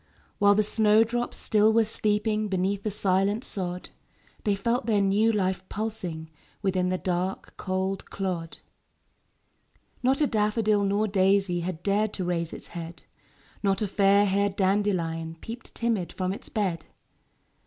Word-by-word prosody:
While 205 -1 +5
the 215 - +3
snow 215 +1 +4
drops 240 +2 -3
still 215 0 +3
were 225 0 +4
sleeping 215 0 0
Beneath 195 +1 0
the 215 - -2
silent 200 +2 +1
sod; 180 -2 -4 0.6
They 205 -2 +2
felt 235 +4 -1
their 215 -3 +3
new 200 +3 +3
life 190 -3 0
pulsing 180 -7 -4 0.3
Within 185 -2 +1
the 185 - 0
dark, 180 +1 -3
cold 190 +1 -3
clod. 180 -4 -4 1.4
Not 260 +2 +2
a 300 - +4
daffodil 215 -3 +1
nor 205 +2 +1
daisy 195 -2 +2
Had 175 -1 -4
dared 210 +1 +1
to 190 - -3
raise 170 -2 -1
its - - -7
head; 170 -1 -8 0.6
Not 195 +1 +1
a - - 0
fairhaired 200 0 +3
dandelion 180 -5 0
Peeped 230 +6 -9
timid 225 -7 -1
from 185 0 -2
its - - -9
bed; 190 -6 -1
THE - - -17
CROCUSES. - - -32
200 Hz, 150 wpm, -27 LUFS, 185-215 Hz, 1.4 s, While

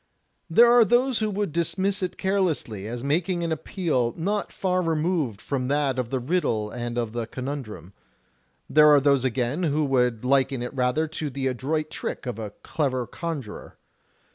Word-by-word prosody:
There 235 +8 +6
are 240 -1 +7
those 240 +4 +2
who 215 -1 0
would 200 -5 -2
dismiss 190 +4 0
it 185 -1 -3
carelessly, 165 - -1
as 120 +2 -5
making 170 +5 0
an 165 - -2
appeal 155 -6 -1
not 200 +5 -1
far 185 -1 0
removed 160 - 0
from 125 +3 -2
that 140 -2 +1
of 120 -2 -2
the 130 - -1
riddle 120 -7 -1
and 120 0 -4
of 115 -3 -1
the 120 -1 -3
conimdrum. 125 - -6 0.7
There 150 0 +6
are 145 -1 +7
those 140 -2 +3
again 130 +4 -1
who 155 -3 +1
would 125 -4 +1
liken 135 -1 +2
it 125 - -5
rather 130 +4 +1
to 155 -1 -4
the 135 0 -4
adroit 150 +5 -1
trick - - -5
of 125 -3 -4
a 110 -2 -4
clever 130 -5 -1
conjurer. 150 - -6
140 Hz, 170 wpm, -25 LUFS, 125-170 Hz, 0.7 s, are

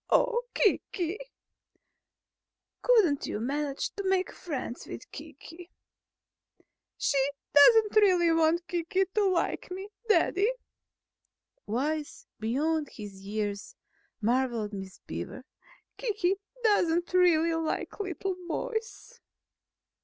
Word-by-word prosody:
"Oh! - - +3
Kiki!" 375 -3 +1 1.6
"Couldn't 410 - +3
you - - -3
manage 280 +4 -2
to 400 - -5
make 380 -1 +1
friends 275 -7 -6
with - - -9
Kiki?" 345 +1 -11 1.3
"She 280 - +1 0.3
doesn't 430 +9 +7
really 365 -5 +5
want 330 +2 +2
Kiki 355 +2 0
to 420 -2 +2
like 360 +2 -1
me, 380 +2 -6 0.2
Daddy." 415 +1 +3 1.2
(Wise 290 +7 -2
beyond 295 +7 0
his 205 -4 -10
years, 205 -1 -3 0.4
marvelled 235 -2 0
Miss 190 -1 -7
Beaver.) - - -6 0.5
"Kiki 400 -5 0 0.3
doesn't 350 -5 +2
really 335 -2 +4
like 325 +4 -3
little 380 -1 -3
boys." 460 +5 -4
335 Hz, 95 wpm, -29 LUFS, 275-390 Hz, 1.6 s, doesn't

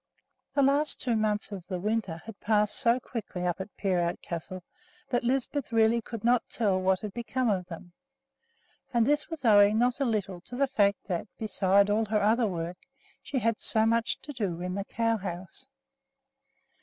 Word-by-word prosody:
The 280 - +4
last 285 +2 +3
two 240 -3 0
months 215 -1 0
of 195 -3 -6
the 185 -2 -3
winter 205 -5 -2
had 225 -3 -10
passed 210 -1 +1
so 240 -1 +2
quickly 210 -7 -5
up 175 +1 -1
at 195 - -10
Peerout 180 -3 0
Castle 180 +2 -6 0.5
that 245 -1 +1
Lisbeth 265 +2 -1
really 225 +1 +3
could 230 -2 -8
not 240 0 +2
tell 200 -5 +1
what 190 0 +2
had 210 -2 -6
become 240 0 -1
of 185 -3 -2
them; 175 0 -10 1.0
and 235 -2 +3
this 295 +6 +1
was 320 -6 -6
owing 205 -1 +6
not 245 +3 +2
a 275 - +1
little 200 -6 -2
to 245 - -9
the 275 +2 +3
fact 205 -7 +1
that, 180 -1 -3
besides 200 -1 +2
all 220 +2 +2
her 215 0 +1
other 225 +2 +3
work, 175 -1 -4 0.4
she 290 - -4
had 230 -3 +1
so 220 0 +2
much 230 +1 +1
to 290 - -7
do 195 -9 -2
in 180 +1 -3
the 195 +1 -3
cow 230 0 0
house. 185 +5 -7
215 Hz, 185 wpm, -28 LUFS, 190-235 Hz, 1.0 s, owing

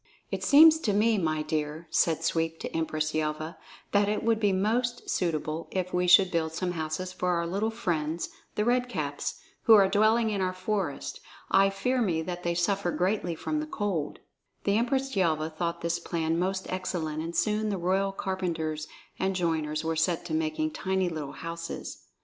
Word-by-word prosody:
"It - - -3
seems 315 +2 +8
to 215 -10 0
me, 215 +1 +3
my 155 -3 0
dear," 155 +1 -3
said 165 -1 +2
Sweep 165 0 0
to - - -5
Empress 155 -1 -1
Yelva, 155 +1 -2 0.3
"that 205 0 +3
it 210 - -1
would 225 -1 +2
be 205 -2 +3
most 235 +6 0
suitable 160 -2 -1
if 185 -1 -3
we 180 0 +1
should 185 +1 +7
build 160 -2 0
some 180 +2 -2
houses 165 +2 -3
for 180 - -1
our 170 0 0
little 200 +6 -1
friends, 170 -8 -2 0.3
the 210 - +1
Red 245 +1 +2
Caps, 145 -9 -3 0.3
who 225 - +9
are 200 -2 +6
dwelling 215 +3 +3
in 200 -2 -1
our 185 0 0
forest. 185 -5 -3 0.3
I 195 0 +5
fear 250 +6 0
me 170 -7 +1
that 180 +1 -5
they 170 -1 -1
suffer 190 +1 +1
greatly 180 0 0
from 305 - -2
the 305 - -4
cold." 195 - -2 0.5
The 200 - +2
Empress 265 +3 0
Yelva 160 -4 +1
thought 170 +1 -3
this 170 0 -1
plan 165 0 -1
most 190 +1 -1
excellent, 165 -4 -2
and 165 +1 -5
soon 210 +5 +1
the 200 - -1
royal 190 +3 +1
carpenters 170 -6 -3 0.3
and 190 0 0
joiners 160 -3 -1
were 160 0 -1
set 165 +2 0
to 170 - -4
making 155 0 0
tiny 190 0 0
little 150 -4 -5
houses. 165 +3 -6
180 Hz, 185 wpm, -28 LUFS, 160-200 Hz, 0.5 s, who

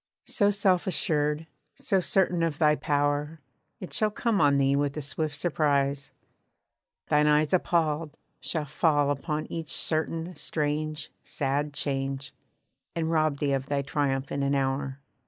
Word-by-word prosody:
So 205 -1 +2
self 195 -3 +2
assured, 150 -4 0 0.3
so 195 - +1
certain 180 -1 +2
of 165 -3 0
thy 150 -1 +4
power, 145 +2 0 0.4
It 185 - -7
shall 215 - +3
come 215 -2 0
on 140 -1 +4
thee 135 0 +3
with 145 +1 0
a - - -2
swift 150 +1 -3
surprise. 140 -3 0 1.0
Thine 150 0 +4
eyes 150 +1 +3
Appalled, 165 -4 +1 0.2
shall 155 -3 -2
fall 145 -1 +2
upon 150 +2 -2
each 165 -2 -4
certain, 165 +2 -1
strange, 155 0 -2
sad 145 +2 -1
change, 135 -1 -2 0.6
And 165 -1 -1
rob 155 -3 +2
thee 140 -1 0
of 135 0 -1
thy 140 -1 0
triumph 140 -1 -1
in 140 - -1
an 140 0 +1
hour. 135 0 -1
150 Hz, 145 wpm, -27 LUFS, 140-165 Hz, 1.0 s, thy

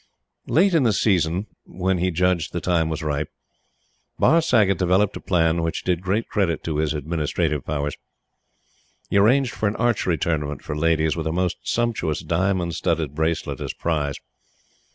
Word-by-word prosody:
Late 185 +4 +3
in 165 - +4
the 115 -5 +3
season, 95 -2 +1 0.2
when 95 0 -1
he 90 +1 +1
judged 90 -1 0
that 85 - -3
the 90 - -1
time 80 -2 +2
was 80 -1 -4
ripe, 75 -1 -2 0.9
Barr 165 +2 +4
Saggott 105 - +3
developed 95 +3 +2
a - - -5
plan 85 -3 +1
which 80 0 -2
did 90 -2 0
great 100 +5 -1
credit 95 -6 0
to 80 -2 -2
his 75 0 0
administrative 75 -1 -1
powers. 75 0 -2 1.2
He - - +3
arranged 125 +5 +2
an 105 0 +1
archery 115 -8 +1
tournament 75 -3 -2
for 75 - -4
ladies, 80 0 +1
with 80 -2 -3
a - - 0
most 90 +1 -1
sumptuous 115 -11 -1
diamond 85 +1 0
studded 80 -4 -1
bracelet 80 -3 -2
as - - -3
prize. 75 -4 -1
85 Hz, 165 wpm, -23 LUFS, 80-100 Hz, 1.2 s, in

